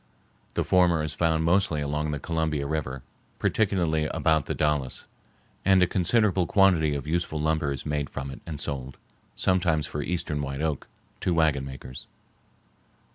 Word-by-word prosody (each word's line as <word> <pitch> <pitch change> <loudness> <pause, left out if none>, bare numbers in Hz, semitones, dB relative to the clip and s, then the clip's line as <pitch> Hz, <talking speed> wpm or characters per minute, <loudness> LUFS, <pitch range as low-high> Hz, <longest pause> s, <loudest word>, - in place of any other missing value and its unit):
The - - +1
former 85 -4 +3
is 75 -1 -3
found 80 0 +1
mostly 85 -2 +2
along 75 +1 -1
the 75 - -2
Columbia 80 -1 -1
River, 70 -3 -3 0.3
particularly 85 -7 +1
about 80 -1 +1
the - - -2
Dalles, 75 -4 -1 0.6
and 95 -1 +5
a - - +6
considerable 95 0 +2
quantity 85 -7 +4
of 70 - -4
useful 80 0 -1
lumber 80 -1 +1
is 70 - -5
made 75 -1 -2
from 70 -1 -5
it - - -10
and 75 -4 -5
sold, 65 -2 -4 0.4
sometimes 85 -5 +1
for 75 - -4
eastern 75 -1 -2
white 70 -1 -4
oak, 80 -2 -2 0.3
to 90 - 0
wagon 75 -4 +2
makers. 65 -1 -9
80 Hz, 155 wpm, -26 LUFS, 70-85 Hz, 0.6 s, a